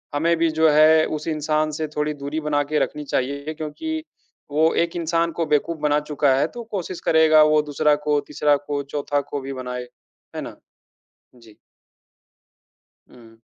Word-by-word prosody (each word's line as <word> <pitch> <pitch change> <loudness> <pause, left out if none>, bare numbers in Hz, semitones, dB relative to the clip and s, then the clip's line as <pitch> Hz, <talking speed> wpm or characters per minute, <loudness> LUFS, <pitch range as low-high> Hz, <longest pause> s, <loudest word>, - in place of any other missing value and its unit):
हमें 170 +3 +2
भी 165 0 +2
जो 160 -1 +6
है, 155 +1 +6
उस 155 +1 -5
इंसान 155 0 0
से 155 +1 -3
थोड़ी 150 0 0
दूरी 150 +3 -3
बना 145 -1 +2
के 150 - +2
रखनी 150 - -2
चाहिए, 140 +4 -2
क्योंकि 315 - -5 0.5
वो 160 +2 +3
एक 170 - -13
इंसान 165 0 0
को 165 - +1
बेवकूफ़ 150 +2 0
बना 150 0 +2
चुका 140 -2 +3
है, - - +2
तो 240 -1 -9
कोशिश 185 -3 -4
करेगा 155 -1 +6
वो 150 - +4
दूसरा 150 +1 +3
को, 145 -1 +3
तीसरा 150 0 +2
को, 145 0 -4
चौथा 145 0 -2
को 145 - -3
भी 135 +1 -6
बनाए। 125 -1 -6 0.5
है - - -3
ना? - - -8 0.8
जी। 115 -3 -18 1.5
हुँ। 115 -2 -17
150 Hz, 170 wpm, -22 LUFS, 145-160 Hz, 1.5 s, जो